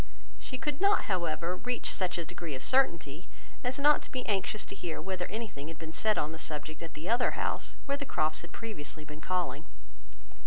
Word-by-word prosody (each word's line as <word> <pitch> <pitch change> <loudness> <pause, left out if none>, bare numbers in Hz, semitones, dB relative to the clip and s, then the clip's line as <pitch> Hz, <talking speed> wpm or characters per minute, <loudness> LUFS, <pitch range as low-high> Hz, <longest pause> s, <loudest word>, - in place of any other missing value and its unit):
She 255 - -4
could 295 +3 -2
not, 400 +1 +6
however, 175 -1 0
reach 250 +3 -1
such 185 -2 +1
a 170 - -2
degree 165 -3 -4
of 130 - -4
certainty, 170 - +3 0.4
as 250 +1 0
not 295 +1 +6
to - - -11
be 255 -1 -2
anxious 205 0 +1
to - - -5
hear 175 -4 -3
whether 185 +1 -2
anything 205 -9 -4
had 165 -1 -6
been 160 0 -6
said 215 +4 +3
on 150 - +1
the 160 - -6
subject 155 +1 -3
at 165 - -6
the 155 +4 -5
other 240 +3 +3
house, - - -1
where 280 0 +1
the 285 - -2
Crofts 155 - +1
had 175 - -10
previously 155 -9 -5
been 150 +1 -8
calling. 180 0 0
180 Hz, 205 wpm, -32 LUFS, 160-235 Hz, 0.4 s, not